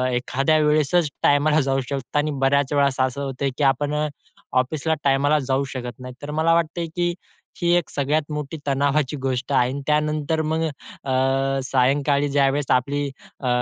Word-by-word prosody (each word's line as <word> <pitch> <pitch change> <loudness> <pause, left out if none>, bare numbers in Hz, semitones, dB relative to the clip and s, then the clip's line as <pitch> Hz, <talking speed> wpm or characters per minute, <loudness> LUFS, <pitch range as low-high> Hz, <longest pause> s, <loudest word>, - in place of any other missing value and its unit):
एखाद्या 135 +5 +1
वेळेसच 150 +2 +2
टायमाला 150 +2 +4
जाऊ 135 0 0
शकतो 135 0 -3
आणि 150 +1 0
बऱ्याच 140 +1 +2
वेळेस 140 -2 +2
असं 130 +1 0
होतं 135 0 -2
की 150 - 0
आपण 140 +2 +2
अ, 150 0 0 0.5
ऑफिसला 155 +5 -1
टायमाला 140 +2 +3
जाऊ 135 0 0
शकत 125 -3 -6
नाही. 125 0 -8
तर 145 0 -6
मला 160 +2 +2
वाटतंय, 170 0 0
की 175 0 0 0.5
ही 170 - +1
एक 175 -3 0
सगळ्यात 145 +2 0
मोठी 150 +1 -4
तणावाची 140 +1 +1
गोष्ट 130 +1 -2
आहे 125 -2 +3
अन् 140 +1 -4
त्यानंतर 150 +1 +1
मग 160 +1 -1 0.4
अ, 135 +1 +1
सायंकाळी 140 +2 +2
ज्यावेळेस 140 0 +2
आपली 140 +3 +1 0.4
अ, 130 - -4
140 Hz, 165 wpm, -22 LUFS, 135-150 Hz, 0.5 s, टायमाला